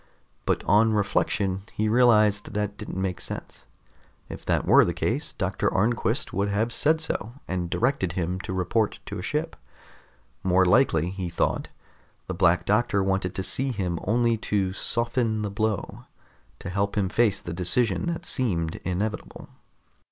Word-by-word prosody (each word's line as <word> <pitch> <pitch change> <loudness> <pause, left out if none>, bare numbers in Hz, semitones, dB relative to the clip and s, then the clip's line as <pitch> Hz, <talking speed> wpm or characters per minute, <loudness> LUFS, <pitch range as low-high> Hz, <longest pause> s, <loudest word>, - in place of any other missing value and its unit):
But - - +1
on 110 +2 +4
reflection, 100 -2 0
he 110 - 0
realized 105 -3 +4
that 105 -1 -1
didn't 105 -3 -6
make 95 -2 -2
sense. - - -7 0.6
If - - -8
that - - +1
were - - +7
the - - -1
case, - - -1
Doctor - - -1
Arnquist 110 +4 0
would 100 +2 0
have 110 +4 0
said 155 +5 +3
so, 120 -8 -3
and 90 -2 -2
directed 120 -5 0
him 90 0 -2
to 95 - -6
report 95 +4 0
to - - -5
a - - -4
ship. - - -2 0.9
More 95 0 +3
likely, 90 - +3
he 95 -2 -4
thought, 85 - -1 0.6
the - - -4
Black 85 +2 +3
Doctor 105 -2 +2
wanted 95 -1 -1
to 95 - -2
see 135 +7 -1
him 90 -7 -2
only 115 +2 +2
to 100 -3 -1
soften 115 +1 0
the 105 - -3
blow, 110 -1 -2 0.5
to - - -7
help 100 +2 -1
him 100 -2 +2
face 105 0 +2
the 85 - -6
decision 95 - 0
that 170 0 -3
seemed 90 - -1
inevitable. 100 +4 -4
100 Hz, 160 wpm, -26 LUFS, 95-115 Hz, 0.9 s, were